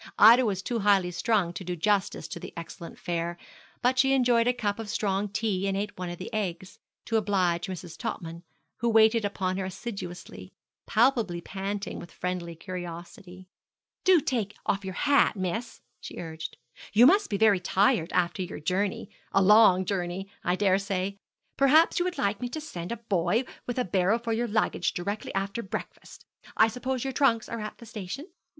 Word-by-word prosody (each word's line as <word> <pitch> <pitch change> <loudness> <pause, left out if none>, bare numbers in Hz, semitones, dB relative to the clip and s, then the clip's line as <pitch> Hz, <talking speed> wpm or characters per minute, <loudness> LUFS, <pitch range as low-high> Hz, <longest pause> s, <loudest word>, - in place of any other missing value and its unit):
Ida 235 +3 +8
was 190 -2 -2
too 235 +3 -2
highly 195 -3 +3
strung 185 -2 +1
to 190 - -6
do 180 0 -3
justice 195 -2 0
to - - -6
the - - -8
excellent 170 +1 -8
fare, 170 0 -3 0.5
but 255 +1 +3
she 270 +1 +4
enjoyed 245 -3 +3
a - - +5
cup 220 -4 -2
of 220 -2 -6
strong 200 0 -1
tea, 200 -2 -1
and 195 0 0
ate 205 +1 -3
one 180 -1 -5
of 175 - -6
the 185 +6 -8
eggs, 190 -3 -4 0.3
to 225 - +1
oblige 185 -5 +1
Mrs. 180 -3 -7
Topman, 170 -8 -5 0.4
who 235 - 0
waited 220 0 +5
upon 190 -2 -1
her 190 - -2
assiduously, 190 -2 -7 0.4
palpably 230 -6 +2
panting 195 +3 -4
with 175 - -10
friendly 180 -2 -4
curiosity. 175 +1 -8 0.6
'Do 370 -2 +6
take 225 -7 -2
off 200 0 0
your 190 -1 -5
hat, 285 -5 +3
miss,' 205 +5 -4 0.2
she - - -9
urged; 160 -2 -6 0.4
'you 230 +4 +7
must 395 +9 +5
be 205 - 0
very 210 -2 +4
tired 180 -2 +2
after 175 +1 0
your 180 - -5
journey 190 +5 -1 0.2
a 195 - +3
long 195 -2 +6
journey, 185 0 -3 0.2
I 180 - +1
daresay. 195 0 0 0.4
Perhaps 300 +6 +5
you 350 - +1
would 360 -1 -3
like 200 +2 0
me 245 - -2
to 315 - -5
send 180 - -7
a 235 - -2
boy 205 0 0 0.2
with 245 - -3
a 250 - +1
barrow 190 +4 +2
for 230 -1 -3
your 235 +2 0
luggage 210 -4 0
directly 200 +4 -3
after 200 +4 -2
breakfast. 195 - -8 0.3
I 220 - +6
suppose 255 +1 -3
your 270 -1 -3
trunks 240 -5 +2
are 230 - -5
at 215 - -6
the 235 - -12
station?' 215 - -6
200 Hz, 185 wpm, -27 LUFS, 180-230 Hz, 0.6 s, Ida